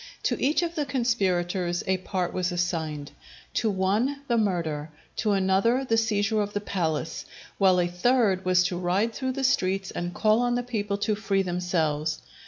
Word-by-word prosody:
To - - 0
each 300 +6 +2
of 340 -1 -2
the 310 -3 -1
conspirators 185 -8 0
a 190 0 +1
part 185 -1 -3
was 180 0 -1
assigned: 160 -5 -2 0.4
to 225 - +1
one 210 +9 0
the 235 - +2
murder, 170 -8 -1 0.3
to 215 -2 +1
another 195 +7 +2
the 225 - +2
seizure 215 -1 +1
of 205 0 -3
the 205 - 0
palace, 165 -6 -2 0.4
while 190 -2 +5
a 175 - +3
third 190 +1 +2
was 180 -1 +4
to 180 -1 -2
ride 190 +6 +1
through 260 +1 -2
the 270 +1 -3
streets 195 -7 +1
and 175 0 -3
call 215 +4 +3
on 245 0 +1
the 245 - -1
people 210 -4 -2
to 205 +1 0
free 200 -2 0
themselves. 160 -4 -1
195 Hz, 180 wpm, -26 LUFS, 175-225 Hz, 0.4 s, while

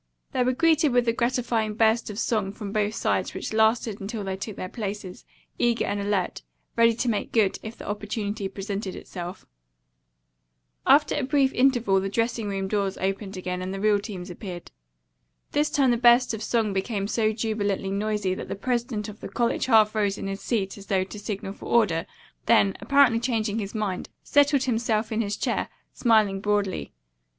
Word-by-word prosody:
They 255 -2 +1
were 255 +1 +2
greeted 315 -1 +3
with 245 -1 +3
a 230 - +3
gratifying 235 -3 0
burst 225 +1 +2
of 205 - -6
song 210 -4 0
from 205 -1 -6
both 210 0 0
sides - - -1
which - - -4
lasted 220 -1 +2
until 210 +2 -4
they 190 -1 -3
took 200 +2 -6
their 185 - -5
places, 200 -2 -6 0.3
eager 240 -1 +2
and 205 - -2
alert, 200 -3 -1 0.3
ready 230 0 +4
to 240 +2 -2
make 215 -3 -1
good 215 -4 +2
if 220 +1 -8
the - - -9
opportunity 205 0 -3
presented 195 0 -5
itself. 175 0 -7 1.4
After 295 +1 +5
a 295 - 0
brief 270 0 +2
interval 240 -7 +3
the 195 - -2
dressing 230 +1 -1
room 195 -1 -2
doors 200 -1 -1
opened 195 +1 -3
again 180 0 -3
and 185 +1 -4
the 195 - -4
real 210 0 +3
teams 190 -3 -7
appeared. 175 -1 -8 0.8
This 300 +1 +1
time 270 -3 +3
the 240 - +2
burst 240 +1 +5
of 220 - -4
song 220 -2 0
became 195 +1 -1
so 215 0 +1
jubilantly 210 -3 -1
noisy 205 -1 0
that - - -6
the - - -4
president 235 0 -2
of 210 0 -9
the - - -7
college 240 +1 0
half 220 -3 +5
rose 205 -2 0
in - - -5
his 195 0 -4
seat 205 -4 -2
as 195 - -13
though 190 -3 +2
to 200 +2 -9
signal 200 -2 -5
for - - -10
order, 195 -8 +2 0.4
then, 205 -4 +4
apparently 275 -5 +4
changing 225 -3 -1
his 205 +1 -5
mind, 205 -4 -2
settled 285 -1 +3
himself 225 -3 0
in 220 +1 +1
his 205 -1 -2
chair, - - -1 0.2
smiling 215 -5 +3
broadly. 205 - -1
215 Hz, 185 wpm, -25 LUFS, 195-235 Hz, 1.4 s, After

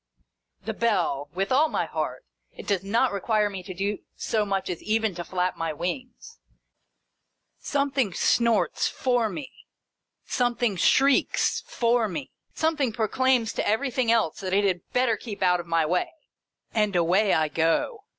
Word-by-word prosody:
The - - -2
bell! 175 -11 0
With 195 +1 -1
all 300 +5 +4
my - - -1
heart. - - -4 0.3
It - - -9
does 195 -3 0
not 230 +6 +2
require 210 +1 0
me 190 -2 -6
to 180 - -9
do 200 +3 -2 0.2
so 215 -2 -1
much 195 -1 -1
as 180 -3 -4
even 220 -1 0
to 175 0 -5
flap 180 +1 -2
my 165 -1 -2
wings. 250 - -6 1.2
Something 280 -6 0
snorts 220 0 +2
for 245 -3 0
me, 280 +4 -7 0.7
some 245 -1 0
thing 235 -5 0
shrieks 270 +9 +3
for 235 -2 +1
me, 265 +9 -6 0.2
something 310 -6 +1
proclaims 235 +2 +1
to - - -2
everything 245 +1 +1
else 225 -9 +1
that 190 -1 -4
it 200 +1 +3
had 185 -3 +1
better 250 -2 +2
keep 205 -3 -6
out 180 -1 +3
of 175 - -7
my 165 -1 +2
way, 180 +3 0 0.3
— - - -44
and 210 -3 +1
away 180 +4 +3
I 155 -1 +2
go. 165 - 0
210 Hz, 160 wpm, -26 LUFS, 180-245 Hz, 1.2 s, all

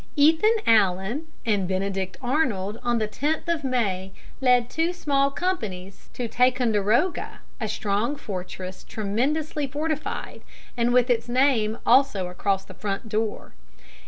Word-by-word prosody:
Ethan 320 +10 +5
Allen 215 - +2 0.2
and 205 -5 +1
Benedict 190 0 -2
Arnold 235 -7 0
on 240 -1 +1
the 215 -1 0
10th 300 +9 -2
of 335 -3 0
May 200 -8 -1 0.3
led 250 -2 +4
two 330 +6 0
small 280 -5 +1
companies 215 - -4
to 245 - -3
Ticonderoga, 240 - +1 0.2
a 220 - -2
strong 215 +5 -1
fortress 185 -6 -6
tremendously 280 +8 -1
fortified, 305 +2 -3 0.3
and 240 0 +1
with 250 0 +4
its 235 0 0
name 240 -4 +2
also 210 -10 +4
across 195 +1 -1
the - - -11
front 205 +2 -4
door. 215 0 -2
235 Hz, 130 wpm, -25 LUFS, 200-280 Hz, 0.3 s, Ethan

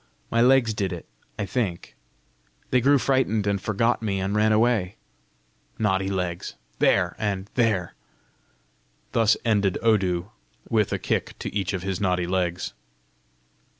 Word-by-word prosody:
My 115 - +3
legs 125 -2 +4
did 100 -2 -2
it, 85 -2 -6 0.3
I 105 - -2
think: 100 -5 -3 0.8
they 125 - +4
grew 140 +3 +5
frightened, 130 -6 +1
and 100 -1 0
forgot 115 +4 +1
me, 100 -3 -1
and 95 +1 -2
ran 110 +1 +3
away! 110 -4 +2 0.8
Naughty 95 -3 +1
legs! 90 -3 -3 0.2
There! - - +3
and 100 -2 -2
there!" 110 -8 +1 1.2
Thus 115 -1 +3
ended 100 -4 +2
Odu, 95 -4 +1 0.4
with 110 -3 +1
a - - 0
kick - - -2
to - - -6
each 100 -1 -1
of 95 -2 -3
his 95 -1 -3
naughty 90 -3 +1
legs. 90 -1 -1
100 Hz, 140 wpm, -25 LUFS, 95-115 Hz, 1.2 s, grew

